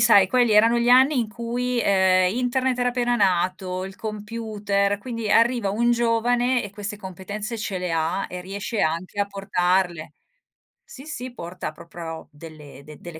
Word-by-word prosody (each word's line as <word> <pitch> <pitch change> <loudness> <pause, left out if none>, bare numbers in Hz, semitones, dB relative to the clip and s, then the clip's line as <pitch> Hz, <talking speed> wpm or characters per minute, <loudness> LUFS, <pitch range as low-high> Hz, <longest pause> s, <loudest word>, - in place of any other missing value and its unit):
sai, 215 -4 +6
quelli 240 +1 +3
erano 225 +3 +5
gli 235 +1 +1
anni 260 +3 +6
in 230 -3 0
cui, 240 +2 -2
uhm, 185 -2 +4
Internet 255 +1 0
era 245 0 +2
appena 245 -1 0
nato, 185 -2 0
il 190 0 -8
computer, 210 -2 -2
quindi 230 0 -5
arriva 235 -2 +3
un 235 +5 +1
giovane 240 +2 +2
e 205 - -7
queste 205 +1 -5
competenze 205 +4 -6
ce 205 -3 -3
le 180 -2 -3
ha, 165 +4 0
e 180 0 -7
riesce 200 +4 -4
anche 170 +5 -1
a 200 - +1
portarle. 180 -5 -1 0.7
Sì, 295 - -12
sì, 255 -5 -6
porta 175 -7 -6
proprio 165 0 -9
delle 150 -3 -12
de 150 -1 -12
delle 170 -2 -9
205 Hz, 165 wpm, -23 LUFS, 185-240 Hz, 0.7 s, sai